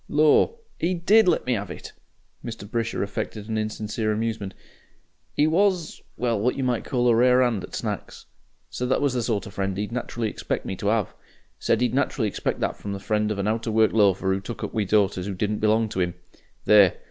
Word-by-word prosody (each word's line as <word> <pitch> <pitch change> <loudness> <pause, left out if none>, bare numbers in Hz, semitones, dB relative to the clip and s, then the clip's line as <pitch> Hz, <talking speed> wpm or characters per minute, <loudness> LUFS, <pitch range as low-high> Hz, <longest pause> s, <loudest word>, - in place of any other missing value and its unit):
Lor'! 155 - +4 0.2
'e 180 +3 0
DID 195 +5 +4
let 175 - +2
me 125 -1 +1
'ave 100 -3 -4
it!" - - -10 0.5
Mr. 115 -3 -7
Brisher 115 0 -2
affected 100 +1 -5
an 110 - -2
insincere 110 0 -2
amusement. 110 -3 -3 0.8
"'E 150 - +4
was, 175 +1 +1 0.2
well 115 -3 0
what 120 +5 +1
you 135 - -1
might 125 -3 0
call 125 -2 0
a 120 - +5
rare 125 +2 +5
'and 115 -6 0
at - - -8
Snacks. - - -5 0.5
Said 125 0 -3
that - - +2
was 140 -3 +1
the 125 - 0
sort 110 -4 -1
of 100 - -10
friend 95 -1 -2
'e'd 105 +2 -3
naturally 120 -1 -3
expect - - -3
me 95 - -3
to 100 +2 -1
'ave. 110 -2 +1 0.5
Said - - +1
'e'd 125 - +1
naturally 135 -4 +1
expect 100 - -3
that - - -1
from 100 - -5
the 100 - -5
friend 105 +1 0
of 105 - -2
a 100 +1 -1
out 115 +2 -1
of 110 - -1
work 110 0 +4
loafer 95 -3 +3
who 95 - -1
took 115 +4 -7
up - - -4
with 105 -4 -1
daughters 100 -3 +2
who 100 - -3
didn't 105 +2 -1
belong 110 +1 +2
to 95 -3 -2
'im. 90 -1 -1 0.5
There! 100 -4 +6
110 Hz, 220 wpm, -24 LUFS, 100-125 Hz, 0.8 s, There